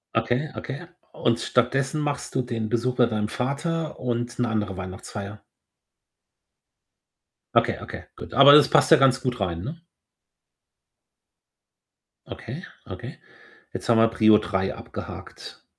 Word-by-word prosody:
Okay, 120 +7 0
okay. 145 +6 -6 0.3
Und 115 -1 0
stattdessen 135 +4 0
machst 145 -2 -3
du 130 - +1
den 115 -3 -4
Besuch 125 +2 0
bei 120 -2 +4
deinem 105 -1 -2
Vater 155 +5 -3
und 120 -1 -3
'ne 125 - 0
andere 105 -4 -2
Weihnachtsfeier? 100 +2 -7 2.1
Okay, - - +3
okay, - - -8
gut. - - -9
Aber 140 +3 +9
das 150 - +8
passt - - +4
ja 160 - +10
ganz 130 -2 +3
gut 125 -3 -2
rein, 85 -3 -2
ne? 160 - -7 2.4
Okay, - - -8 0.2
okay. - - -9 0.5
Jetzt - - -6
haben 115 -1 +4
wir 115 0 +5
Prio 110 -1 +5
3 95 -2 -2
abgehakt. - - -9
120 Hz, 130 wpm, -24 LUFS, 110-135 Hz, 2.4 s, ja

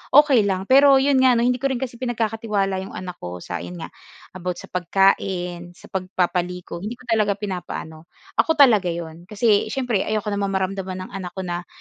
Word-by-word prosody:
okey 275 -8 +6
lang. 190 -1 -1
Pero 275 +5 +6
'yon 270 0 +3
nga 260 -1 +5
'no, 235 - +2
hindi 250 +1 +1
ko 275 - +1
rin 265 - -1
kasi 245 -2 -5
pinagkakatiwala 220 -5 -1
'yong 190 - -8
anak 180 -1 -7
ko 90 0 -7
sa 90 -1 -4
'yon 90 +1 -8
nga - - -8 0.4
about 180 -1 -4
sa - - -12
pagkain, 180 -1 0
sa - - -16
pagpapaligo. 180 -2 -2
Hindi 210 +6 -5
ko 250 - -18
talaga 215 -4 +1
pinapa-ano. 180 -5 -6 0.3
Ako 320 - +4
talaga 235 -10 +5
'yon. 170 0 -6
Kasi 210 0 +2
siyempre 240 -3 -1
ayoko 215 0 -1
naman 200 0 -1
mamaramdaman 190 -1 -2
ng - - -18
anak 185 -3 -6
ko 190 - -4
na 175 0 -4
195 Hz, 195 wpm, -22 LUFS, 180-235 Hz, 0.4 s, okey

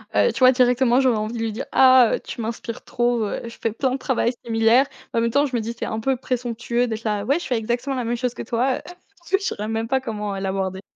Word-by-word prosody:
heu, 480 - +4
tu - - -5
vois, 255 -1 +7
directement, 250 0 +3
j'aurais 255 -4 +3
envie 215 +2 -3
de 235 - -4
lui 225 -1 -1
dire: 225 - -5
«Ah! 255 -3 +6
Heu, - - -5
tu - - -7
m'inspires 230 +1 -5
trop, 240 -1 0
heu, 205 - -3
je 230 - -9
fais 225 - -1
plein 255 +4 -1
de 260 - -1
travail 255 -2 0
similaire.» 225 +3 +4 0.3
en 230 - +2
même 230 0 +1
temps, 285 +4 +3
je 265 -3 -4
me 235 - 0
dis: 230 +2 -4
«C'est - - -2
un 220 - -3
peu 265 +2 0
présomptueux 240 -1 -2
d'être 225 0 -5
là 210 -2 0
"Ouais, 280 +9 +1
je - - -7
fais 250 - 0
exactement 240 +5 -2
la 250 - -2
même 235 +1 -1
chose 245 0 -2
que - - -6
toi, 245 +3 0
heu!"». - - -9 0.5
Je 385 - +5
saurais 215 - -3
même 225 0 -2
pas 265 +2 +1
comment, 210 -5 -4
heu, - - -4
l'aborder. 190 -1 -2
235 Hz, 275 wpm, -22 LUFS, 225-255 Hz, 0.5 s, vois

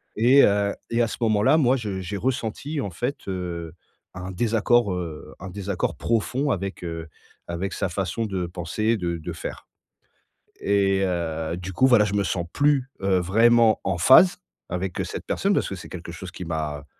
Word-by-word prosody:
Et, 125 +6 +6
heu, 100 0 +3 0.2
et 115 +1 +1
à - - +1
ce - - -6
moment-là, 110 +6 +4
moi, 130 -4 +4
je 100 -5 -4
j'ai 100 +3 -4
ressenti 130 +5 -2
en 100 - -3
fait, 125 +10 -3
heu, 85 -3 -4 0.4
un 90 +1 -6
désaccord, 115 +1 +2
heu, 85 -4 -6
un 95 - -7
désaccord 100 -1 -2
profond 125 +5 0
avec, 95 -2 -3
heu, 85 -1 -5 0.4
avec 85 +3 -3
sa 95 - -1
façon 95 +5 -2
de 95 -4 -2
penser, 95 +6 -1
de 85 -3 -2
de 80 +2 -6
faire 85 - -7 1.0
et 100 -1 +2
heu, 85 -2 -2
du 90 +1 -6
coup, 130 +6 +4
voilà, 120 -5 +5
je 105 - -3
me 100 -1 +2
sens 85 -2 -2
plus, 140 -3 +2
heu, 95 -1 +2
vraiment 115 +4 +4
en 95 -2 -1
phase 130 - +7 0.3
avec 90 +1 -3
cette - - -6
personne - - +1
parce - - +1
que - - -4
c'est - - -10
quelque 85 -1 -7
chose 90 0 -8
qui 90 - -7
m'a, 75 -3 -3
95 Hz, 185 wpm, -24 LUFS, 85-115 Hz, 1.0 s, phase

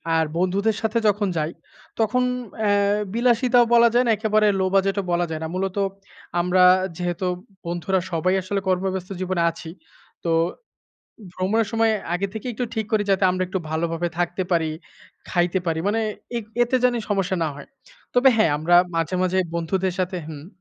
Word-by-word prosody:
আর 160 - +3
বন্ধুদের 195 +5 +1
সাথে 220 +1 0
যখন 205 0 +2
যাই, 155 +2 -1 0.5
তখন 250 +3 +2 0.4
অ্যা 210 -2 +1 0.4
বিলাসিতাও 245 0 +3
বলা 235 0 +7
যায় 245 +1 +4
না। 230 - +3
একেবারে 215 0 +2
লো 190 - +2
বাজেট 195 +1 +2
ও - - -10
বলা 175 0 +1
যায় 160 -1 -4
না। - - -2
মূলত 190 +1 -2 0.6
আমরা 180 +1 +3 0.3
যেহেতু 175 0 -2 0.4
বন্ধুরা 175 +2 -1
সবাই 180 +3 +1
আসলে 195 +2 -2
কর্মব্যস্ত 185 0 -1
জীবনে 185 -2 -1
আছি। 165 0 -10 0.5
তো 170 - -1 1.0
ভ্রমণের 205 +4 0
সময় 225 -1 +2 0.2
আগে 195 +3 -1
থেকেই 230 +3 -4
একটু 245 +2 -2
ঠিক 220 -2 -2
করি 215 -1 +2
যাতে 195 0 +2
আমরা 185 0 -1
একটু 190 +1 -2
ভালোভাবে 165 +2 -1
থাকতে 175 +2 -1
পারি, 165 -2 +2 0.6
খাইতে 175 +1 +1
পারি। 160 -1 0
মানে 220 +2 +1 0.4
এত 220 - -5 0.2
এতে 240 +2 0
জানি 245 -1 +3
সমস্যা 195 -2 0
না - - 0
হয়। 145 - -11 0.5
তবে 255 +2 +6
হ্যাঁ 190 -9 +4
আমরা 170 +3 +3 0.2
মাঝে, 165 +2 0
মাঝে 185 +1 0 0.2
বন্ধুদের 185 +2 -1
সাথে 185 0 -1
হুম 150 0 -9
190 Hz, 170 wpm, -23 LUFS, 175-215 Hz, 1.0 s, বলা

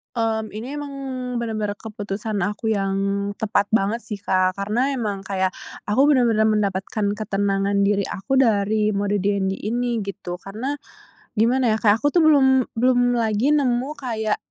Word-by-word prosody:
Mmm, 220 -2 -1
ini 250 +7 -5
emang 290 -1 -6 0.4
bener-bener 215 -3 -2
keputusan 210 -1 -4
aku 210 +4 -1
yang 195 -2 0 0.4
tepat 205 -2 +1
banget 215 +2 +1
sih, 215 - -6
Kak, 185 -2 +1
karena 230 +8 0
emang 210 -5 -2
kayak, 190 -1 0 0.3
aku 260 +8 +3
bener-bener 235 -6 +3
mendapatkan 205 0 0
ketenangan 200 -1 0
diri 200 0 +2
aku 195 +8 -4
dari 215 -3 +2
mode 205 +1 0
DND 195 -1 0
ini, 240 +2 -1
gitu. 180 -3 -6
Karena 225 +8 -4 0.6
gimana 235 +1 +3
ya, - - -1
kayak 215 0 +3
aku 290 - +3
tuh 345 - +3
belum 285 -4 +6 0.3
belum 245 +1 +3
lagi 230 +4 +1
nemu 255 -2 +1
kayak, 220 -6 -2
215 Hz, 150 wpm, -22 LUFS, 200-240 Hz, 0.6 s, belum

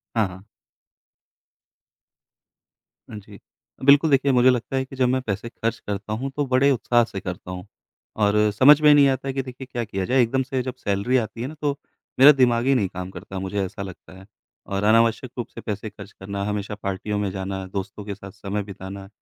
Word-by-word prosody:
हाँ, 110 -3 +2
हाँ। 95 +1 -12 2.7
हाँ 110 - -8
जी। 100 - -14 0.4
अ, - - -12
बिल्कुल 145 +3 +6
देखिए 140 0 +3
मुझे 125 0 +5
लगता 125 +1 0
है 130 0 0
कि 135 - -11
जब 130 -1 +2
मैं 130 +1 +1
पैसे 110 -1 -4
ख़र्च 115 0 -3
करता 105 +1 -4
हूँ 130 +5 -3
तो 145 - 0
बड़े 130 +2 +3
उत्साह 120 -1 +2
से 100 -4 -6
करता 90 0 -6
हूँ 90 0 -7 0.6
और 105 0 +3 0.2
समझ 135 +8 +7
में 150 -1 +7
नहीं 145 -1 +6
आता 135 0 -2
है 135 - -2
कि 135 - -1
देखिए 130 0 -9
क्या 120 - -2
किया 95 -4 -3
जाए। 130 +4 +3
एकदम 130 +3 +1
से 130 0 -2
जब 130 0 -5
सैलरी 100 +5 0
आती 115 -1 -3
है 125 - -2
ना 150 - -8
तो 145 -1 0 0.4
मेरा 140 +3 +10
दिमाग 125 -4 +2
ही 135 0 +4
नहीं 105 -6 +1
काम 90 0 -6
करता 95 0 -7
मुझे 95 +1 -2
ऐसा 95 - -8
लगता 95 -1 -9
है। 95 - -14 0.4
और 100 0 -3
अनावश्यक 115 +3 +3
रूप 120 - -3
से - - -11
पैसे 105 0 -4
ख़र्च 100 0 -12
करना, 100 +1 -6
हमेशा 105 0 -3
पार्टियों 100 +1 -3
में 100 -1 -1
जाना, 95 0 -4
दोस्तों 100 +2 -6
के 100 -1 -5
साथ 95 0 -11
समय 105 0 -4
बिताना, 95 0 -9
110 Hz, 210 wpm, -23 LUFS, 100-130 Hz, 2.7 s, मेरा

